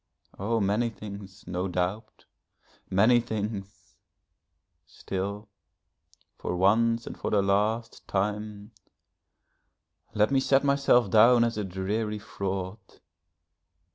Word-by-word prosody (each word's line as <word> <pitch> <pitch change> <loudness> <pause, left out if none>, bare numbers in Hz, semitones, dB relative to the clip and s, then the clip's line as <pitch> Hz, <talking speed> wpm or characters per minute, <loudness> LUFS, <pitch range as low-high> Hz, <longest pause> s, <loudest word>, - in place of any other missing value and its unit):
Oh, 115 +4 0
many 105 +4 +1
things, 100 -3 -10
no 90 +1 -2
doubt, 90 +4 -3 0.6
many 110 +6 +5
things. 105 -4 -6 0.9
Still, 100 +6 -5 0.9
for - - -3
once 115 +5 +3
and - - -7
for - - -4
the 100 -2 +2
last 105 +4 0
time, 105 +1 -3 1.4
let 105 +4 +3
me 135 - +4
set 135 +1 +3
myself 140 -6 +3
down 115 +2 +6
as 115 0 0
a 105 - -2
dreary 100 +3 -2
fraud. 95 -1 -4
105 Hz, 105 wpm, -27 LUFS, 95-115 Hz, 1.4 s, down